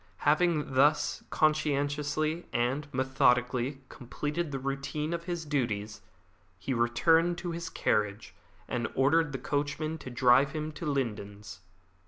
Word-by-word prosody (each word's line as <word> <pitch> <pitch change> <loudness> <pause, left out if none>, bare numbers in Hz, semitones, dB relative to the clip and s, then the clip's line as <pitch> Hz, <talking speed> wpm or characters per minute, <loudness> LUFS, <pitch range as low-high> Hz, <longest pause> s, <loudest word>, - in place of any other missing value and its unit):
Having 155 -2 +2
thus 145 +4 +3
conscientiously 150 +1 0
and 135 +5 -1
methodically 130 0 +1
completed 150 +7 -4
the 135 - -2
routine 135 +4 -3
of 170 0 -4
his 175 -2 -3
duties, 110 -8 -2 0.6
he 135 - -3
returned 160 +9 +3
to 175 -1 -4
his 170 +1 -5
carriage 105 - -1 0.3
and 120 -1 -2
ordered 150 +4 +3
the 135 - -3
coachman 145 +4 -2
to 130 - -8
drive 125 +2 +4
him 155 0 -3
to 160 +3 -7
The 150 - 0
Lindens. 105 -6 -4
140 Hz, 130 wpm, -29 LUFS, 125-155 Hz, 0.6 s, drive